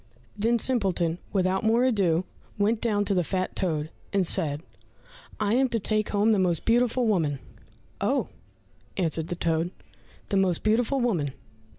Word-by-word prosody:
Then 225 Hz, +3 st, +2 dB
Simpleton 190 Hz, -9 st, 0 dB
without 190 Hz, 0 st, +1 dB
more 225 Hz, +2 st, +3 dB
ado 190 Hz, -8 st, +2 dB, 0.3 s
went 210 Hz, +2 st, +1 dB
down 205 Hz, -3 st, +1 dB
to 200 Hz, -, +1 dB
the 180 Hz, -2 st, +2 dB
fat 185 Hz, +2 st, -2 dB
toad, 155 Hz, -4 st, -1 dB, 0.2 s
and 195 Hz, -2 st, +2 dB
said, 155 Hz, -4 st, 0 dB, 0.8 s
"I 210 Hz, 0 st, +1 dB
am 260 Hz, +2 st, +3 dB
to 230 Hz, -, 0 dB
take 215 Hz, +1 st, 0 dB
home 210 Hz, +2 st, +2 dB
the 210 Hz, -, +3 dB
most 175 Hz, -3 st, +1 dB
beautiful 240 Hz, +1 st, +2 dB
woman!" 165 Hz, -10 st, +1 dB, 0.6 s
"Oh," -, -, 0 dB, 0.7 s
answered 165 Hz, -3 st, 0 dB
the 175 Hz, -, -3 dB
toad, 165 Hz, 0 st, 0 dB, 0.6 s
"the 200 Hz, -, +1 dB
most 185 Hz, -3 st, +1 dB
beautiful 235 Hz, +5 st, +2 dB
woman! 175 Hz, -, 0 dB
195 Hz, 155 wpm, -26 LUFS, 170-225 Hz, 0.8 s, more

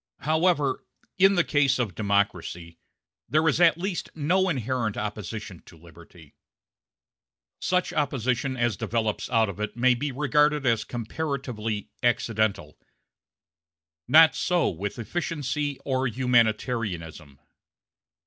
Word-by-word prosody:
However, 155 Hz, -3 st, +1 dB, 0.4 s
in 195 Hz, +1 st, +6 dB
the 175 Hz, -, +3 dB
case 140 Hz, -4 st, +2 dB
of 115 Hz, -7 st, -2 dB
democracy, 90 Hz, -4 st, -2 dB, 0.5 s
there 155 Hz, +5 st, +2 dB
is 160 Hz, +2 st, +2 dB
at 170 Hz, -1 st, +5 dB
least 185 Hz, 0 st, -3 dB
no 180 Hz, +5 st, +1 dB
inherent 125 Hz, -, -2 dB
opposition 105 Hz, -2 st, -6 dB
to 85 Hz, -, -15 dB
liberty; 80 Hz, -1 st, -16 dB, 1.3 s
such 180 Hz, -1 st, 0 dB
opposition 130 Hz, -2 st, -1 dB
as 120 Hz, -3 st, +1 dB
develops 110 Hz, 0 st, -2 dB
out 115 Hz, -2 st, +3 dB
of 100 Hz, 0 st, -7 dB
it 105 Hz, +2 st, -4 dB
may 125 Hz, +1 st, +4 dB
be 140 Hz, +4 st, -3 dB
regarded 150 Hz, +2 st, +2 dB
as 115 Hz, -3 st, +2 dB
comparatively 120 Hz, -4 st, -4 dB
accidental. 110 Hz, -3 st, 0 dB, 1.3 s
Not 160 Hz, +5 st, +7 dB
so 180 Hz, -1 st, +1 dB
with 95 Hz, +6 st, -5 dB
efficiency 145 Hz, +1 st, -3 dB
or 130 Hz, -1 st, 0 dB
humanitarianism. 110 Hz, -, -1 dB
125 Hz, 110 wpm, -26 LUFS, 105-150 Hz, 1.3 s, Not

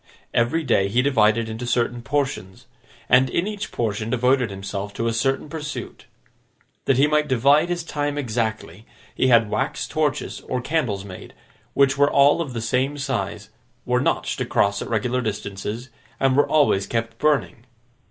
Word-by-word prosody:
Every 130 Hz, +8 st, +1 dB
day 100 Hz, -8 st, +2 dB
he 120 Hz, +6 st, +1 dB
divided 115 Hz, -4 st, +3 dB
into 110 Hz, +2 st, -5 dB
certain 120 Hz, 0 st, 0 dB
portions, 120 Hz, -7 st, -3 dB, 0.4 s
and 130 Hz, 0 st, +4 dB
in 170 Hz, -, 0 dB
each 205 Hz, -1 st, -5 dB
portion 110 Hz, -1 st, -2 dB
devoted 125 Hz, 0 st, +2 dB
himself 100 Hz, +1 st, -6 dB
to 115 Hz, -, -2 dB
a 115 Hz, -, 0 dB
certain 135 Hz, +6 st, 0 dB
pursuit. 150 Hz, -6 st, -7 dB, 0.8 s
That 135 Hz, -, +2 dB
he 140 Hz, -, +5 dB
might 150 Hz, 0 st, +1 dB
divide 140 Hz, +6 st, +3 dB
his 175 Hz, -1 st, -2 dB
time 145 Hz, -2 st, -3 dB
exactly, 110 Hz, -, -3 dB, 0.3 s
he 130 Hz, -, +1 dB
had 115 Hz, -4 st, +4 dB
wax -, -, -2 dB
torches -, -, -2 dB
or 125 Hz, -, -1 dB
candles 125 Hz, -8 st, -1 dB
made, 95 Hz, -2 st, -11 dB, 0.4 s
which 140 Hz, 0 st, +3 dB
were 145 Hz, 0 st, +5 dB
all 140 Hz, +4 st, +4 dB
of 145 Hz, -6 st, -5 dB
the 115 Hz, -, -3 dB
same 130 Hz, +5 st, 0 dB
size, 135 Hz, -3 st, -3 dB, 0.4 s
were -, -, +1 dB
notched -, -, -1 dB
across 100 Hz, 0 st, +1 dB
at -, -, -5 dB
regular 120 Hz, +3 st, 0 dB
distances, 105 Hz, +2 st, -5 dB, 0.3 s
and 135 Hz, -1 st, +2 dB
were 145 Hz, -, +4 dB
always 140 Hz, -10 st, +3 dB
kept 115 Hz, 0 st, -3 dB
burning. 140 Hz, -5 st, 0 dB
125 Hz, 160 wpm, -22 LUFS, 110-140 Hz, 0.8 s, he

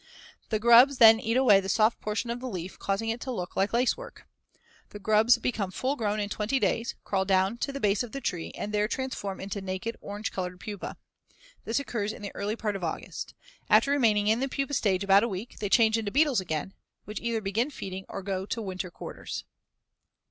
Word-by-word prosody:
The 220 Hz, -, +1 dB
grubs 235 Hz, +5 st, +7 dB
then 225 Hz, -2 st, +8 dB
eat 230 Hz, 0 st, 0 dB
away 230 Hz, -7 st, +6 dB
the 190 Hz, 0 st, -5 dB
soft 220 Hz, +2 st, +2 dB
portion 215 Hz, +3 st, -2 dB
of 240 Hz, -, -4 dB
the 255 Hz, +1 st, -5 dB
leaf, 185 Hz, -3 st, -6 dB
causing 200 Hz, +3 st, -1 dB
it 230 Hz, +2 st, -3 dB
to 260 Hz, -, -4 dB
look 180 Hz, -7 st, -5 dB
like 195 Hz, +2 st, +1 dB
lacework. 255 Hz, -, -1 dB, 0.6 s
The -, -, -9 dB
grubs 215 Hz, +3 st, +4 dB
become 215 Hz, -6 st, -2 dB
full 260 Hz, +9 st, -1 dB
grown 215 Hz, -4 st, -1 dB
in 205 Hz, -, -1 dB
twenty 215 Hz, +5 st, -1 dB
days, 230 Hz, -2 st, 0 dB
crawl 195 Hz, -1 st, 0 dB
down 190 Hz, +3 st, +2 dB
to 275 Hz, -, -2 dB
the 275 Hz, -, -5 dB
base 205 Hz, -4 st, +2 dB
of 245 Hz, -3 st, -5 dB
the 275 Hz, -, -4 dB
tree, 175 Hz, -10 st, -3 dB
and 210 Hz, -, -5 dB
there 210 Hz, 0 st, +2 dB
transform 225 Hz, -6 st, -4 dB
into 200 Hz, +1 st, -5 dB
naked, 190 Hz, +4 st, -4 dB
orange 205 Hz, +1 st, -5 dB
colored 180 Hz, -1 st, -4 dB
pupae. 205 Hz, -1 st, -6 dB, 0.7 s
This 225 Hz, -, 0 dB
occurs 215 Hz, -6 st, -3 dB
in -, -, -11 dB
the 200 Hz, -, -5 dB
early 205 Hz, +2 st, -2 dB
part 210 Hz, -3 st, -2 dB
of 195 Hz, -, -5 dB
August. 165 Hz, -, -5 dB, 0.3 s
After 280 Hz, -, +5 dB
remaining 220 Hz, -7 st, +3 dB
in 220 Hz, +2 st, +3 dB
the 270 Hz, +1 st, -1 dB
pupa 275 Hz, +1 st, -2 dB
stage 200 Hz, -7 st, +1 dB
about 195 Hz, 0 st, +6 dB
a 235 Hz, -, +1 dB
week, 195 Hz, +4 st, -6 dB
they 205 Hz, -, -2 dB
change 225 Hz, +1 st, +4 dB
into 215 Hz, -2 st, -3 dB
beetles 275 Hz, -2 st, +3 dB
again, 165 Hz, +1 st, -4 dB, 0.3 s
which 210 Hz, -, -6 dB
either 235 Hz, -1 st, -1 dB
begin 215 Hz, +6 st, -1 dB
feeding 190 Hz, -8 st, -7 dB
or 195 Hz, -, -6 dB
go 190 Hz, 0 st, -3 dB
to 230 Hz, -, -3 dB
winter 185 Hz, -3 st, -4 dB
quarters. -, -, -7 dB
215 Hz, 215 wpm, -28 LUFS, 195-235 Hz, 0.7 s, then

